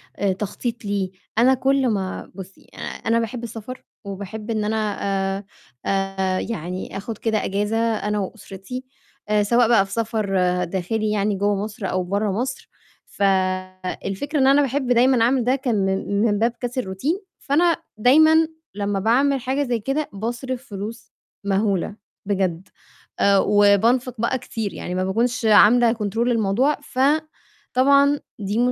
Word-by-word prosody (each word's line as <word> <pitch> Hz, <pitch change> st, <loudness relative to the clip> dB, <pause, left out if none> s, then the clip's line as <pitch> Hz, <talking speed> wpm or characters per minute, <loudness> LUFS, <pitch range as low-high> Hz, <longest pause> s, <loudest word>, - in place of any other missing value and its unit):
آآ 195 Hz, -1 st, 0 dB
تخطيط 225 Hz, +4 st, -4 dB
ليه، 200 Hz, -2 st, -1 dB, 0.3 s
أنا 250 Hz, +3 st, +5 dB
كل 265 Hz, +1 st, +2 dB
ما 195 Hz, -5 st, -3 dB
بُصّي 190 Hz, 0 st, -11 dB
أ -, -, -15 dB
أنا 230 Hz, +1 st, -1 dB
باحب 230 Hz, +1 st, -4 dB
السَفر 230 Hz, +2 st, -7 dB, 0.2 s
وباحب 200 Hz, +3 st, -7 dB
إن 215 Hz, -1 st, 0 dB
أنا 215 Hz, -1 st, -1 dB, 0.4 s
آآ 200 Hz, -, -8 dB, 0.4 s
آآ 195 Hz, -1 st, 0 dB
يعني 185 Hz, -3 st, -5 dB
آخُد 215 Hz, +2 st, -6 dB
كده 220 Hz, -1 st, -1 dB
إجازة 205 Hz, +3 st, -1 dB
أنا 215 Hz, -2 st, 0 dB
وأُسرتي، 200 Hz, +4 st, -7 dB, 0.5 s
آآ 210 Hz, -1 st, +3 dB
سواء 235 Hz, +3 st, +3 dB
بقى 220 Hz, -4 st, +4 dB
في 195 Hz, -, -15 dB
سَفر 225 Hz, -2 st, -1 dB, 0.4 s
داخلي 210 Hz, +5 st, -2 dB
يعني 205 Hz, -1 st, +1 dB
جوّا 205 Hz, +1 st, +1 dB
مصر 210 Hz, -2 st, -5 dB
أو 185 Hz, 0 st, 0 dB
برّا 200 Hz, +3 st, -1 dB
مصر، 255 Hz, +6 st, -3 dB, 0.4 s
فالفكرة 190 Hz, -, -1 dB
إن 265 Hz, -, +4 dB
أنا 280 Hz, +2 st, +6 dB
باحب 275 Hz, -1 st, -1 dB
دايمًا 245 Hz, 0 st, +4 dB
أعمل 250 Hz, +1 st, +2 dB
ده 250 Hz, +3 st, +2 dB
كان 260 Hz, -4 st, -1 dB
من 195 Hz, +1 st, -1 dB
من 205 Hz, -2 st, +1 dB
باب 230 Hz, +2 st, +2 dB
كَسر 250 Hz, +1 st, -2 dB
الroutine، 235 Hz, -, -2 dB, 0.2 s
فأنا 330 Hz, +4 st, +2 dB, 0.2 s
دايمًا 315 Hz, +7 st, +5 dB, 0.3 s
لمّا 200 Hz, -1 st, -1 dB
باعمل 265 Hz, +7 st, +2 dB
حاجة 265 Hz, +4 st, 0 dB
زي 245 Hz, -3 st, -1 dB
كده 270 Hz, +7 st, -2 dB
باصرِف 240 Hz, +5 st, -4 dB
فلوس 215 Hz, +2 st, -7 dB, 0.3 s
مَهولة 200 Hz, 0 st, 0 dB, 0.3 s
بجد 190 Hz, -3 st, -1 dB, 0.5 s
آآ 200 Hz, 0 st, +5 dB
وبانفِق 210 Hz, +6 st, +3 dB
بقى 235 Hz, +2 st, +1 dB
كتير 220 Hz, -4 st, -5 dB
يعني 180 Hz, -, -5 dB
ما 185 Hz, -, 0 dB
باكونش 230 Hz, +5 st, 0 dB
عاملة 225 Hz, +2 st, +6 dB
control 210 Hz, -2 st, -4 dB
للموضوع، 235 Hz, +5 st, +2 dB
فطبعًا 280 Hz, -1 st, +1 dB, 0.2 s
دي 205 Hz, +1 st, -2 dB
220 Hz, 145 wpm, -22 LUFS, 200-250 Hz, 0.5 s, أنا